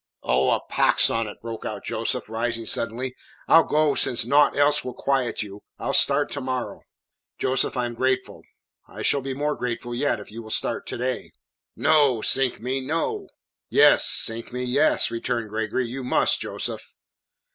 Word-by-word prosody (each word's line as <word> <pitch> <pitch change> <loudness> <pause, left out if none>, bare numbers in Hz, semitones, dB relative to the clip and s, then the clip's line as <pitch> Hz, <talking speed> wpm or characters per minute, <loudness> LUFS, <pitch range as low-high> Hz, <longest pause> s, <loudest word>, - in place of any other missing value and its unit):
"Oh, 65 +2 +2
a - - +1
pox - - +3
on 115 -1 -1
it," 105 - -9
broke 115 -1 -7
out - - -6
Joseph, - - -2
rising 115 +1 -3
suddenly. 125 +4 -1 0.3
"I'll 165 - +7
go 150 -1 +2
since 120 - +2
naught 145 +4 +3
else 145 +1 +3
will 125 -1 -6
quiet 135 -5 -1
you. 100 0 -10 0.2
I'll - - -3
start 145 +1 +3
to 140 - -4
morrow." 130 -1 -4 0.6
"Joseph, 130 0 0
I 125 - 0
am 120 - -4
grateful. 130 +2 -1 0.5
I - - -8
shall 140 - +2
be 135 0 -5
more 150 +2 -1
grateful 120 0 -4
yet 120 -1 0
if 105 - -11
you 115 +2 -7
will 110 - -11
start - - -2
to - - -4
day." 125 +1 -3 0.4
"No, 145 -5 +3
sink 135 +2 +1
me, 130 +4 -2
no." 270 - -2 0.4
"Yes, - - +5
sink 115 +1 +1
me, 125 +1 -4
yes," 140 +5 +2
returned 115 -1 -3
Gregory. 110 +3 -2
"You 130 +3 -6
must, 125 - +2
Joseph." - - -5
125 Hz, 175 wpm, -24 LUFS, 115-140 Hz, 0.6 s, I'll